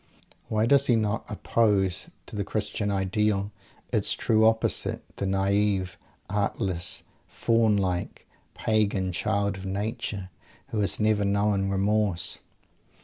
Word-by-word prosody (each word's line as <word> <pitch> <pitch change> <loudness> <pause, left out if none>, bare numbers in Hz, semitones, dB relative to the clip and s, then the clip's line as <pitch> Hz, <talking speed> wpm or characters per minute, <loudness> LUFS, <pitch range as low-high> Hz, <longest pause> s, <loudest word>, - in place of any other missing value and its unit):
Why 110 0 +1
does 140 +3 +4
he 120 - +5
not 110 0 -1
oppose, 100 -3 +1 0.2
to - - -10
the 100 - -1
Christian 105 0 -2
Ideal, 100 +1 0 0.4
its - - +2
true 110 0 +3
opposite 110 0 0
the 100 - -2
naive, 95 -1 +1 0.3
artless, 100 -3 -1 0.2
faun 115 -2 +2
like, 90 -3 -2 0.3
pagan 100 -4 +1
"child 100 +3 0
of 95 - -8
Nature," 100 -1 -3 0.4
who 110 - -2
has 100 -3 +1
never 105 -1 +2
known 100 -1 +1
"remorse"? 100 -2 0
100 Hz, 120 wpm, -27 LUFS, 95-110 Hz, 0.4 s, he